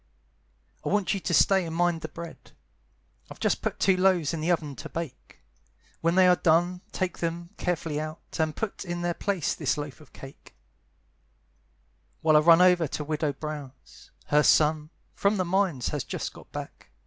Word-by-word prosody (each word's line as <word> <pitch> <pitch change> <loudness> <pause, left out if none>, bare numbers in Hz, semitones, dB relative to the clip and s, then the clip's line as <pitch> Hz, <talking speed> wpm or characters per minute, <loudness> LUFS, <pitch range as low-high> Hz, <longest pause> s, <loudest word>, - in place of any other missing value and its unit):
"I - - -2
want 205 -1 +1
you 195 - -2
to 165 -1 -4
stay 190 +4 +4
and 165 -1 -5
mind 175 -1 +1
the - - -4
bread, 170 -1 -10 0.8
I've - - -11
just - - 0
put - - -3
two 190 - +4
loaves 185 -4 +2
in 160 - -3
the 160 - -1
oven 155 -5 0
to - - -8
bake; 160 -6 -8 0.6
When 165 +1 +1
they 185 -1 +6
are 180 - +6
clone 175 +2 +2
take 185 -1 -3
them 170 +1 -3
carefully 160 -4 -2
out, 155 +1 -6 0.2
And 155 -1 0
put 220 -2 -4
in 175 -2 -4
their 175 0 0
place 195 -3 -1
this - - -1
loaf 145 0 -6
of 150 - -17
cake, 135 0 -13 1.7
"While 155 -1 +4
I - - +8
run 165 +3 +6
over 180 -3 +4
to 150 - -4
Widow 150 -1 -1
Brown's; 145 -3 -9 0.2
Her 150 0 +4
son, 150 0 +3 0.2
from 200 +1 +1
the 185 - 0
mines, 175 -8 0
has - - -3
just - - -5
got - - -15
back. - - -8
165 Hz, 185 wpm, -27 LUFS, 150-180 Hz, 1.7 s, I